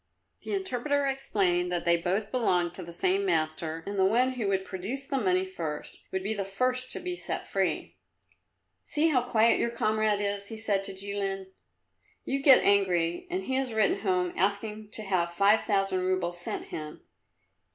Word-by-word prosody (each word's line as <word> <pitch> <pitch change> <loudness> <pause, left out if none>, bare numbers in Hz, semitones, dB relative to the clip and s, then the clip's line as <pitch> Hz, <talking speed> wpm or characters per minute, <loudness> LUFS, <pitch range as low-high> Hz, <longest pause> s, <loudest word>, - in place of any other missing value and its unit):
The - - -3
interpreter 285 -6 0
explained 195 -10 0
that 175 -1 -1
they 170 0 +5
both 190 +5 -1
belonged 180 -9 +1
to 185 - -7
the 170 -1 -8
same 375 - +1
master, 160 - -1
and 200 0 -3
that - - +5
the 190 - +4
one 250 +4 +3
who 245 -5 -3
would 190 -1 0
produce 210 +10 -5
the 275 -1 -1
money 185 -4 +2
first 165 -5 -6
would 190 0 -2
be 210 +3 -1
the 200 -2 -2
first 255 +6 -1
to - - -3
be 360 0 -4
set - - -4
free. - - -2 0.9
"See 310 +2 +2
how 260 -5 +3
quiet 230 -2 +3
your 235 - +1
comrade 215 -2 +1
is," 200 0 -2
he 220 - -7
said 205 -3 0
to 195 - -4
Jilin. 195 -1 -3 0.7
"You 275 +1 -1
get 270 -2 +7
angry 185 - +2
and 370 +2 -2
he 265 - -3
has 265 -3 -1
written 215 -2 +2
home 180 -3 0
asking 210 +2 -1
to 215 - -6
have 180 -4 0
five 200 +4 +4
thousand 195 -2 +1
roubles 180 -2 -1
sent - - -5
him. 155 -1 -7
200 Hz, 185 wpm, -28 LUFS, 185-245 Hz, 0.9 s, get